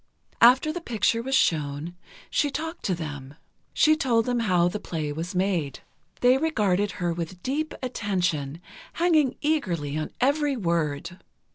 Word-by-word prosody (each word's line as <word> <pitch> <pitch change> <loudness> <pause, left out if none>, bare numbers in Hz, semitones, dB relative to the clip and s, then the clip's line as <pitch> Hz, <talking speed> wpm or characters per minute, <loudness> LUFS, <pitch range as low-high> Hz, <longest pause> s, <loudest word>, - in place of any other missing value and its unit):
After 260 +6 +6
the 350 - -5
picture 230 - 0
was 265 +3 -1
shown, 150 - 0 0.4
she 295 - +2
talked 320 +4 -5
to 185 - +1
them. 145 -4 -7 0.4
She 310 0 +4
told 240 -7 +1
them 245 -1 0
how 180 -6 +3
the 180 +4 -3
play 155 -6 -4
was 170 +5 -5
made. 180 -7 -1 0.4
They 250 +2 +5
regarded 205 - +1
her 175 -1 -1
with 175 +1 -6
deep 300 +4 -2
attention, 175 - -2 0.3
hanging 315 -6 +2
eagerly 175 - -1
on 155 - -3
every 285 +1 +2
word. 170 -3 -2
200 Hz, 145 wpm, -26 LUFS, 165-265 Hz, 0.4 s, After